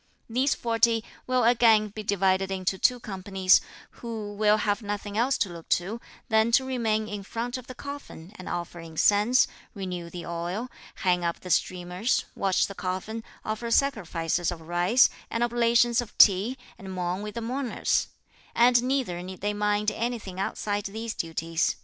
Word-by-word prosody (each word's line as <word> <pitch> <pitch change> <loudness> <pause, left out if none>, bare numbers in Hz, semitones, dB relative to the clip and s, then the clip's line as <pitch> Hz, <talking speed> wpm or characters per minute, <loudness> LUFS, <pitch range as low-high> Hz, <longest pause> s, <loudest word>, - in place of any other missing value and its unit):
These 255 +4 +1
forty 230 -1 +2 0.2
will 255 -1 +2
again 225 -2 +5
be 215 +2 -7
divided 195 -1 +1
into 190 0 -2
two 250 -1 +3
companies, 195 -3 +2 0.4
who 220 -3 -5
will 210 +1 +3
have 205 +1 0
nothing 205 -1 -4
else 250 +4 +2
to 200 - 0
look 170 -1 -10
to 205 +7 -6 0.3
than 220 +1 +3
to 260 - +5
remain 225 -4 0
in 205 -1 -5
front 235 +5 -4
of 255 -1 -7
the 255 - -8
coffin 280 - -9
and 185 - -8
offer 175 0 -4
incense, 205 +9 +3 0.3
renew 180 -3 -5
the 175 0 -7
oil, 175 +8 -4 0.3
hang 180 -1 +3
up 170 0 -2
the 180 - -6
streamers, 180 +7 0
watch 195 -2 +2
the 200 - -7
coffin, 190 +5 -4 0.2
offer 220 +2 -3
sacrifices 175 - +1
of 175 -2 -5
rice, 175 +9 +4 0.2
and 230 - 0
oblations 240 0 +3
of 240 - -10
tea, 205 +6 +6 0.2
and 190 -1 -8
mourn 180 +1 -2
with 210 +1 -6
the 235 - -3
mourners; 250 +2 0 0.5
and 240 0 +5
neither 250 -9 -1
need 185 0 -8
they 205 +1 0
mind 210 0 +1
anything 230 -6 -4
outside 205 +1 -2
these 220 +3 -4
duties. 165 0 -1
210 Hz, 165 wpm, -27 LUFS, 185-235 Hz, 0.5 s, tea